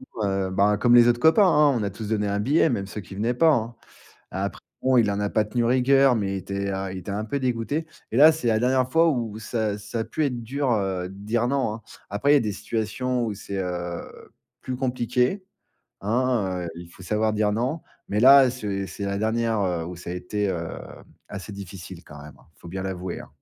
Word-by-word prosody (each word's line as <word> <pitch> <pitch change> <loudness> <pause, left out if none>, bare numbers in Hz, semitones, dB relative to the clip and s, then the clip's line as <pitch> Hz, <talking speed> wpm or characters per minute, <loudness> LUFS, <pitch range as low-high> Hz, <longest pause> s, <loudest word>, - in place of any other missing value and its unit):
ans, 110 - -1 0.2
heu, - - -5
ben, 100 +2 +2
comme 120 +2 +4
les 120 0 +7
autres 120 - +2
copains, 160 - +5
hein, 150 -4 +5
on 110 - -2
a 100 - -1
tous 105 +2 -7
donné 105 -1 0
un 100 0 -1
billet 145 +9 +3
même 100 -7 -2
ceux 105 - -6
qui 95 +2 -11
venaient 115 +4 0
pas, 160 +6 +4
hein. 115 -1 -2 0.6
Heu, - - -3
après 100 +1 -3 0.2
bon, 130 -1 +3
heu, - - +7
il 105 - -1
en 100 0 -2
a 105 - -1
pas 110 - +2
tenu 120 +3 -1
rigueur, 130 +1 +4
mais 100 -3 -1
il - - -2
était, 100 +1 -4
heu, 95 0 -3
il 95 - -6
était 95 +2 -6
un 105 +2 -2
peu 140 +6 -2
dégoûté. 130 +5 -2 0.2
Et - - -3
là, 155 +4 +8
c'est 155 -7 -2
la 110 -1 +3
dernière 130 +1 +1
fois 165 +2 +4
où 115 -7 -2
ça 110 -1 -2
ça 105 +3 -5
a 110 - -1
pu 155 - -2
être 125 -4 -2
dur, 135 +2 -1
heu, 95 -4 -1
de 95 - -11
dire 110 +4 -1
non, 130 -5 0
hein. 110 - -10 0.3
Après, 135 +9 +2
il - - +7
y - - +7
a - - 0
des 105 -3 -2
situations 120 +4 -2
où 110 -2 -3
c'est, 100 -1 -6
heu, 90 -1 -6 0.3
plus 130 - -5
compliqué, 125 - 0 0.6
hein, 105 -5 0
heu. - - -4
Il 85 0 -9
faut 95 - -15
savoir 110 +3 0
dire 105 -1 +1
non, 130 +9 -2 0.3
mais 105 - -1
là, 135 +1 +8
c'est 100 -6 -4
c'est 100 +3 -6
la 100 0 -2
dernière, 110 0 0
heu, 90 -4 -1
où 90 - -6
ça 85 - -10
a 90 - -3
été, 100 +3 -2
heu, 85 -3 -3 0.6
assez 100 +1 -7
difficile 95 -2 -9
quand 75 - -13
même, 75 0 -11
hein. - - -24
Faut 85 - -13
bien 95 +2 -5
l'avouer, 95 -1 -5
hein. - - -11
110 Hz, 245 wpm, -24 LUFS, 100-125 Hz, 0.6 s, là